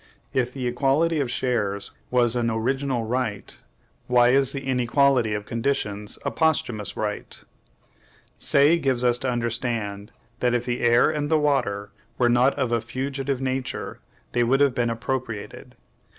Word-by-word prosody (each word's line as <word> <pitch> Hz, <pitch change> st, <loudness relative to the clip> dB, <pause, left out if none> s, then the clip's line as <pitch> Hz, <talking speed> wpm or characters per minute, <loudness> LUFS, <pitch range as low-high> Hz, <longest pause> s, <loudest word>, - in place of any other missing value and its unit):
If 125 Hz, -1 st, 0 dB
the 130 Hz, -1 st, -5 dB
equality 140 Hz, +6 st, +1 dB
of 135 Hz, -4 st, -1 dB
shares 105 Hz, -6 st, -1 dB, 0.2 s
was 120 Hz, -1 st, +2 dB
an 120 Hz, -1 st, +1 dB
original 125 Hz, +2 st, -1 dB
right, 115 Hz, -3 st, -3 dB, 0.5 s
why 120 Hz, -1 st, +5 dB
is 135 Hz, 0 st, +5 dB
the 135 Hz, -1 st, -5 dB
inequality 125 Hz, -2 st, +2 dB
of 105 Hz, 0 st, -5 dB
conditions 110 Hz, -4 st, -2 dB
a -, -, 0 dB
posthumous 120 Hz, -, 0 dB
right? 105 Hz, -1 st, -4 dB, 1.0 s
Say 145 Hz, +5 st, +4 dB
gives 130 Hz, -5 st, 0 dB
us 120 Hz, -1 st, +3 dB
to 130 Hz, -, -2 dB
understand 115 Hz, -4 st, -2 dB, 0.3 s
that 125 Hz, -1 st, +1 dB
if 120 Hz, 0 st, -1 dB
the 120 Hz, 0 st, -2 dB
air 120 Hz, +4 st, +4 dB
and 150 Hz, -1 st, -2 dB
the 160 Hz, -, +4 dB
water 120 Hz, -9 st, 0 dB, 0.3 s
were 120 Hz, -1 st, +3 dB
not 125 Hz, +3 st, +3 dB
of 130 Hz, -3 st, -1 dB
a 115 Hz, -1 st, +1 dB
FUGITIVE 135 Hz, +1 st, -3 dB
nature, 130 Hz, -1 st, -3 dB, 0.3 s
they 120 Hz, -, +2 dB
would 130 Hz, +3 st, +2 dB
have 140 Hz, -2 st, +4 dB
been 120 Hz, -1 st, 0 dB
appropriated. 115 Hz, -2 st, -5 dB
125 Hz, 150 wpm, -24 LUFS, 115-135 Hz, 1.0 s, why